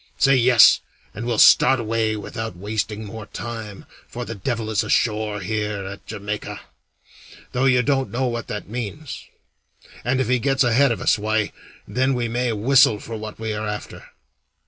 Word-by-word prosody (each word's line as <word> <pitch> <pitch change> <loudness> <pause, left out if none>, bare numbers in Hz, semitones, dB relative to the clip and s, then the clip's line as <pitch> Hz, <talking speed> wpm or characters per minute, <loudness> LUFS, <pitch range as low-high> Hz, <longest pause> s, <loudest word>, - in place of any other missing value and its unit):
Say 135 -1 +4
'Yes,' 125 -3 +6 0.3
and 115 +3 -6
we'll 120 -2 0
start 130 +4 +6
away 110 -1 0
without 110 0 -6
wasting 105 +2 -3
more 110 0 -8
time, 110 -4 -7 0.2
for 120 +1 -6
the 115 - -5
devil 110 +1 -3
is 105 - +1
ashore 105 -2 0
here 105 0 -3
at 100 +1 -9
Jamaica 105 +1 -5 0.9
though 125 +2 0
you 125 -2 +4
don't 135 0 0
know 130 +2 -1
what 120 -2 -3
that 105 - -5
means 125 +6 -6 0.8
and 130 +3 0
if 130 - 0
he 125 0 +2
gets 135 +2 +2
ahead 125 +2 +3
of 115 - -2
us, - - +2
why, 110 0 0 0.4
then 130 +5 +1
we 120 -1 -1
may 120 +1 -1
whistle 125 +1 +4
for 115 - -7
what 110 -1 -7
we 110 -1 -3
are 110 0 -3
after. 105 0 -6
115 Hz, 170 wpm, -22 LUFS, 105-125 Hz, 0.9 s, Yes